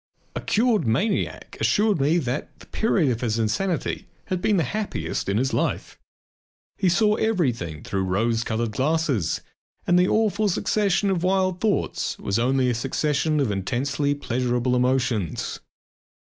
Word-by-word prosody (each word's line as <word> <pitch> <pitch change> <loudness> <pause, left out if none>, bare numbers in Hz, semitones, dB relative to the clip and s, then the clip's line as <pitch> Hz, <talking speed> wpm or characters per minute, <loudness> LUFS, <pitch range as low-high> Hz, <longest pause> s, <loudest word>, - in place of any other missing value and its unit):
A - - -3
cured 220 - +2
maniac 195 - -1
assured 210 -7 +2
me 150 +5 +3
that 130 -3 -3
the - - -14
period 185 - +1
of 115 - -3
his 115 -2 0
insanity 160 - -1 0.2
had 185 -1 -2
been 205 +1 +2
the 170 - +2
happiest 205 - -3
in 100 - +1
his 130 +3 0
life. - - -2 0.8
He 185 - +2
saw 210 +4 +3
everything 125 - -1
through 95 -1 -2
rose 115 +5 +1
coloured 115 0 -2
glasses 135 - 0 0.4
and 175 0 +4
the 180 - +4
awful 215 -1 +2
succession 200 +1 +1
of 180 -3 0
wild 185 0 +1
thoughts 215 -3 0
was 100 +3 -1
only 130 +2 +2
a 125 - +2
succession 150 +5 0
of 135 -7 +1
intensely 135 +8 -1
pleasurable 125 -2 0
emotions. 125 -7 0
140 Hz, 145 wpm, -24 LUFS, 120-190 Hz, 0.8 s, and